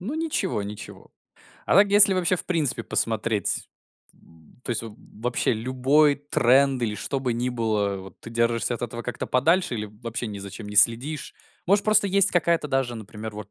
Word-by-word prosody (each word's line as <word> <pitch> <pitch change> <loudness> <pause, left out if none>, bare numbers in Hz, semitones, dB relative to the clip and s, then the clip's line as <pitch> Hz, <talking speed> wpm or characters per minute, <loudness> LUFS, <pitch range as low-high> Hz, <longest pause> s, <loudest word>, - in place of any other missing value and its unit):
Ну 230 +12 -5
ничего, 305 - -1
ничего. 105 +1 -9 0.6
А - - +2
так, 200 +1 +6
если, 205 -1 +6
вообще, 185 0 +1
в - - -4
принципе, 150 -9 0
посмотреть, 110 -2 -1 0.5
м, 80 +8 -23
то - - -4
есть 115 - -1
вообще 115 +3 -3
любой 130 +6 +2
тренд 135 -2 +2
или 105 -2 -1
что 135 +6 -3
бы 125 -3 -1
ни 120 +2 -2
было, 105 -5 -1
вот 95 -1 -13
ты 115 - -10
держишься 115 +1 0
от 120 - -7
этого 120 0 -5
как-то 125 - -5
подальше 160 +3 +2
или 105 -1 -4
вообще 115 +3 -6
ни 105 -2 -6
за 100 0 -8
чем 105 +1 -9
не 105 - -7
следишь. 125 +8 +2 0.3
Может, 200 +2 +2 0.2
есть 200 0 +3
какая-то 170 -3 +1
даже, 135 -3 -1
например, 110 0 -8
вот 105 -1 -9
120 Hz, 180 wpm, -24 LUFS, 110-150 Hz, 0.6 s, так